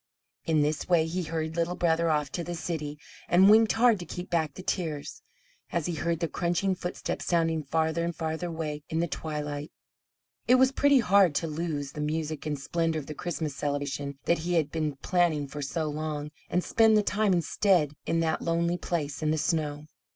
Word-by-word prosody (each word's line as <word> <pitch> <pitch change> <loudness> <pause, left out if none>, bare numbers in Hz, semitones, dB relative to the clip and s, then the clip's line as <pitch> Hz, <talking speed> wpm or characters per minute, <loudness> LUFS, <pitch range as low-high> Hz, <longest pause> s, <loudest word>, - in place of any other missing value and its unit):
In 160 -2 +2
this 150 +3 -1
way 170 -3 +4
he 175 +3 -2
hurried 160 -1 -3
Little 170 +1 0
Brother 170 -1 +2
off 150 -3 0
to 170 - -3
the 175 +1 -4
city 155 -3 -4 0.3
and 190 +3 +7
winked 220 0 +6
hard 230 -2 +4
to 175 - -6
keep 180 0 -7
back 160 -4 0
the 185 - -8
tears, 160 -7 -3 0.5
as 170 -3 -1
he 175 - -1
heard 165 +2 -1
the 170 - +1
crunching 175 +4 0
footsteps 180 -1 -4
sounding 165 -2 +1
farther 160 +3 0
and 170 0 -2
farther 160 +2 -3
away 160 -3 -4
in 160 - -1
the 170 - +1
twilight. 150 -2 -4 0.8
It 250 - +7
was 260 +1 +5
pretty 280 -1 +4
hard 195 -6 +4
to 165 - 0
lose 150 -3 -3
the 150 - -6
music 155 0 -2
and 150 -1 -1
splendour 165 +2 -1
of 145 - -8
the 155 - -6
Christmas 155 -3 -4
celebration 140 -1 -3
that 170 - +2
he 175 +2 -1
had 155 -3 +1
been 155 -3 -1
planning 170 -5 +2
for 145 +2 -7
so 155 +3 -2
long, 150 0 -3 0.2
and 180 +1 +1
spend 220 -1 +4
the 210 - +3
time 210 0 +1
instead 175 -2 +2
in 165 - +1
that 160 -1 0
lonely 170 +1 0
place 150 -4 -3
in 155 - +1
the 155 - +1
snow. 150 -2 -1
165 Hz, 200 wpm, -28 LUFS, 150-175 Hz, 0.8 s, and